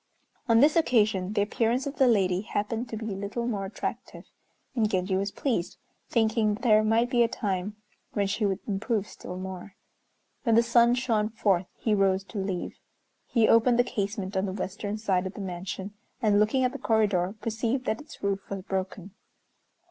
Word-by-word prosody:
On 230 0 +6
this 295 +2 +5
occasion 215 - +2
the 205 -2 +2
appearance 230 +4 0
of 280 +1 -5
the 265 - +5
lady 190 -5 +3
happened 220 +3 -3
to 225 - -4
be 220 -1 -4
a - - -5
little 200 +4 -3
more 205 -5 -2
attractive, 195 - -6 0.5
and 220 -4 +2
Genji 185 -1 0
was 195 +2 0
pleased, 215 -5 -2 0.3
thinking 220 -2 +2
there 215 -2 +4
might 225 +3 +2
be 240 - +3
a 235 - +5
time 205 -4 -3 0.4
when 200 - +1
she 200 +3 -1
would 195 -2 +1
improve 210 +1 -1
still 180 - -8
more. 190 +1 -7 0.7
When 230 -4 +2
the 230 - +6
sun 235 +1 +4
shone 225 -4 0
forth 195 -5 +1
he 220 - 0
rose 195 -1 +2
to 210 - -2
leave. 190 -2 -4 0.5
He 230 -3 +3
opened 235 +1 +5
the 245 - +5
casement 200 -4 -3
on 190 +1 +1
the 190 - -3
western 200 +2 -4
side 190 -4 0
of 190 - -9
the - - -8
mansion, 190 +2 -5 0.3
and, 210 -4 +3
looking 220 +5 +2
at 250 - +2
the - - -7
corridor, 205 -4 +1
perceived 230 +4 -2
that 220 - -1
its 305 -7 -14
roof 195 -1 -2
was 195 -1 -5
broken. 190 0 -4
210 Hz, 185 wpm, -27 LUFS, 195-230 Hz, 0.7 s, On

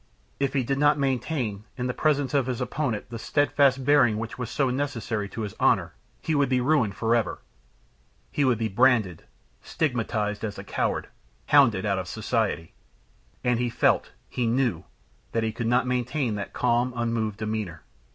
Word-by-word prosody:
If 140 -1 0
he 135 -2 +1
did 135 +3 -1
not 145 0 +4
maintain, 130 -6 -1
in 125 0 -2
presence 145 -3 +1
of 135 -3 +2
his 125 -2 -2
opponent, 125 -4 -2
the 115 - -5
steadfast 140 0 +2
bearing 125 -7 +4
which 115 +1 -5
was 125 -1 -5
so 135 -4 +1
necessary 120 -6 -2
to 115 - -6
his 105 -2 -4
honor, - - +2 0.3
he 160 - 0
would 140 -3 +2
be 130 -1 +2
ruined 125 -6 +2
forever. 115 -2 0 0.9
He 145 - +1
would 130 -4 +3
be 115 0 -1
branded, 110 -5 +2 0.4
stigmatized 110 -8 -1
as 105 -2 -4
a - - -7
coward, - - -2 0.4
hounded 120 -10 +5
out 100 -2 +1
of 90 - -5
society! 110 -5 -2 0.7
And 125 -1 +2
he 120 0 0
felt, 115 - +2 0.2
he 120 -2 -2
knew, 125 0 0 0.5
that 115 - +1
he 110 - 0
could 115 +1 -3
not 125 +2 +3
maintain 125 0 -1
that 100 -1 -5
calm, 120 +2 +1
unmoved 115 -3 -1
demeanor. 110 -6 -4
120 Hz, 170 wpm, -26 LUFS, 110-135 Hz, 0.9 s, hounded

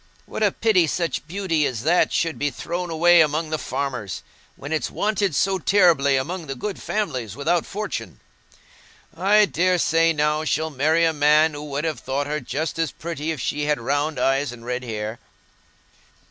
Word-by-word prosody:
What - - -6
a 210 -2 +4
pity 190 -7 +2
such 165 -1 -2
beauty 170 -3 0
as 120 -3 -4
that 175 +2 +3
should 165 -1 -1
be 145 - +1
thrown 175 +6 -4
away 170 +1 +5
among 155 +1 0
the 155 - -1
farmers, 130 -7 -4 0.3
when 145 - -9
it's 155 - -1
wanted 205 -5 0
so 190 +5 +1
terribly 165 -8 +4
among 165 +5 -4
the 135 - -4
good 195 +10 -5
families 130 - -3
without 165 +5 0
fortune! 115 - -5 1.0
I 210 +3 +4
daresay, 170 -3 +2
now, 150 0 0
she'll 155 +1 -1
marry 155 +4 +2
a 165 - +2
man 150 +1 +4
who 145 0 -7
would 145 0 -3
have 160 -2 -2
thought 135 +2 -2
her 150 +1 -2
just 155 +2 -4
as 165 -2 0
pretty 160 -2 -5
if 160 -3 -2
she 145 +4 -2
had 150 0 +1
had - - -10
round 145 +3 0
eyes 135 0 +1
and 120 -1 -11
red 125 +1 -3
hair." 110 -1 -5
155 Hz, 180 wpm, -23 LUFS, 140-170 Hz, 1.0 s, away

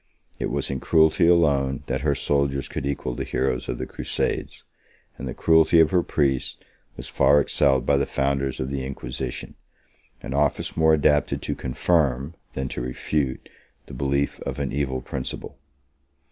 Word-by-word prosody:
It - - -1
was - - -2
in 65 - -2
cruelty 80 +3 +4
alone 70 -6 +3
that - - -2
her 70 -1 +1
soldiers 70 -1 0
could 70 - -4
equal 70 -3 -2
the - - -3
heroes 65 -2 -1
of - - -2
the - - -4
Crusades, - - -3 0.5
and 65 - -7
the 65 - -5
cruelty 80 0 +4
of 80 -1 +5
her 90 -1 +4
priests 70 -6 0 0.4
was - - -7
far 70 +2 +4
excelled 65 -3 +2
by 70 - +3
the 70 - 0
founders 70 0 -1
of 65 +1 -3
the 70 -1 -2
Inquisition; 65 -2 -5 0.7
31 65 - -5
an 70 +1 +3
office 75 0 -2
more 80 -1 +5
adapted 75 -1 +2
to - - -2
confirm, 70 0 0 0.2
than 65 0 -3
to - - -4
refute, 65 +2 -2 0.4
the - - -11
belief 70 +2 -1
of 70 0 -5
an 70 -2 -3
evil 65 -2 -1
principle. 65 +1 -6
70 Hz, 170 wpm, -24 LUFS, 65-75 Hz, 0.7 s, of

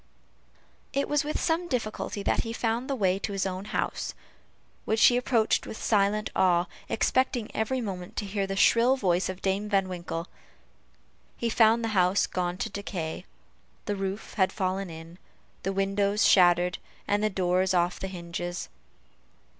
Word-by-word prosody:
It 280 +1 0
was 295 0 +1
with 300 +1 -2
some 335 +1 0
difficulty 215 -5 -3
that - - +1
he 230 - -2
found 230 +3 -1
the 275 - 0
way 190 -5 +1
to 200 - -3
his 195 -1 -1
own 190 +1 -4
house, - - -3 0.7
which 220 0 +3
he 245 - +6
approached 245 -3 +1
with 220 - -6
silent 210 0 +1
awe, 175 -2 +3 0.2
expecting 250 -1 +1
every 250 +4 0
moment 185 -5 -6
to 210 - -2
hear 195 0 -2
the 195 - -3
shrill 235 +6 +4
voice 185 -5 +1
of 185 0 -7
Dame 200 +2 0
Van 195 -2 +2
Winkle. 170 -1 -5 1.1
He 235 -1 -1
found 225 +1 +4
the 225 - 0
house 185 -2 +3
gone 180 -1 -2
to - - -3
decay 180 -4 -5 0.6
the 205 - -1
roof 195 +1 -4
had 190 -2 +3
fallen 190 -1 -2
in, 165 +2 -10 0.4
the 195 - -1
windows 200 +1 +1
shattered, 180 -1 +4 0.3
and 205 0 +1
the 215 - +3
doors 185 -1 +1
off 175 0 +1
the 190 - -3
hinges. 175 -1 -5
195 Hz, 160 wpm, -27 LUFS, 185-220 Hz, 1.1 s, he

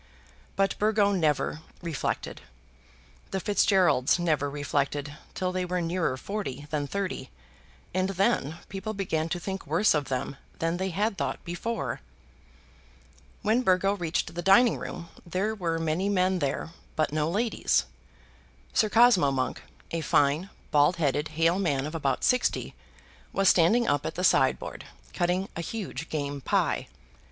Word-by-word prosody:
But 195 0 +1
Burgo 210 -1 +3
never 155 -4 0 0.2
reflected. 165 -5 -3 0.9
The 190 - -2
Fitzgeralds 185 -8 +3
never 155 -5 +1
reflected 145 0 -2 0.2
till 185 -1 -1
they 185 0 -1
were 180 0 -1
nearer 165 -5 -1
forty 145 -6 -5
than 145 -2 -1
thirty, 190 -7 -3 0.6
and 185 +1 +1
then 195 - +1
people 205 +3 -5
began 165 -5 -1
to 175 - -2
think 190 +2 -5
worse 210 - +3
of 150 -2 0
them 135 +1 -3 0.2
than 165 +1 -1
they 190 +1 -1
had 200 +3 -1
thought - - -3
before. 185 - -3 1.4
When 220 +4 +3
Burgo 195 -2 +3
reached 170 -4 -2
the 175 - -3
dining 200 +6 +5
room 170 -1 -7
there 185 +5 -1
were 170 -6 -1
many 165 +4 0
men 185 -1 +2
there, 145 +2 -2 0.2
but 155 -2 0
no 155 0 +1
ladies. 220 +6 +1 0.9
Sir 215 - +3
Cosmo 230 - +5
Monk, 130 -2 -2 0.3
a 165 - -1
fine 150 +5 +2 0.2
bald 150 +4 +4
headed 150 -2 0
hale 165 +3 +3
man 145 -8 0
of 155 - -5
about 145 -4 -1
sixty, 250 -1 +1 0.6
was 195 -1 +4
standing 220 +8 +4
up 145 -1 +1
at 160 - -5
the 180 - -3
sideboard, - - +2 0.3
cutting 180 +2 0
a 170 - -3
huge 185 -3 -5
game 145 -2 -3
pie. - - 0
175 Hz, 145 wpm, -27 LUFS, 150-195 Hz, 1.4 s, dining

